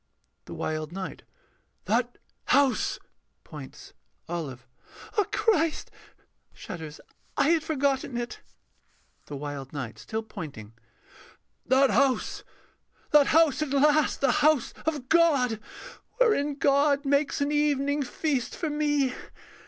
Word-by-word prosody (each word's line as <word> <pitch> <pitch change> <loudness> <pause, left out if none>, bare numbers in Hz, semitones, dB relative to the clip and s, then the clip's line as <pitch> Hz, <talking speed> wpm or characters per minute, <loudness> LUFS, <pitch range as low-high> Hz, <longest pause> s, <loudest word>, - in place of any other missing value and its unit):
_] - - -49
THE - - -8
WILD 155 0 -3
KNIGHT. 190 +1 -6 0.6
That 240 +2 0 0.3
house.... 270 -1 +2 0.5
[Points.] 145 -4 -11 0.3
OLIVE. 145 -8 -5 0.5
Ah 420 -3 +3
Christ! 330 -8 +1 0.6
[Shudders.] 160 -2 -8 0.4
I 285 - +3
had 330 -1 +3
forgotten 275 -5 0
it. 240 0 -5 0.9
THE 145 - -6
WILD 140 -1 -6
KNIGHT 120 -6 -6
[still 220 - -4
pointing]. 145 - -9 0.9
That 265 +1 +4
house! 275 -2 +1 0.7
the 295 -2 +7
house 315 -2 +4
at 305 - -1
last, 295 +2 +3
the 275 -2 +4
house 300 -3 +2
of 295 -5 -1
God, 280 -9 +3 0.6
Wherein 360 - +2
God 280 0 +2
makes 280 +2 +1
an 285 +1 0
evening 290 -1 +1
feast 275 -1 -2
for 315 -3 -3
me. 290 -3 +1
275 Hz, 115 wpm, -27 LUFS, 205-295 Hz, 0.9 s, the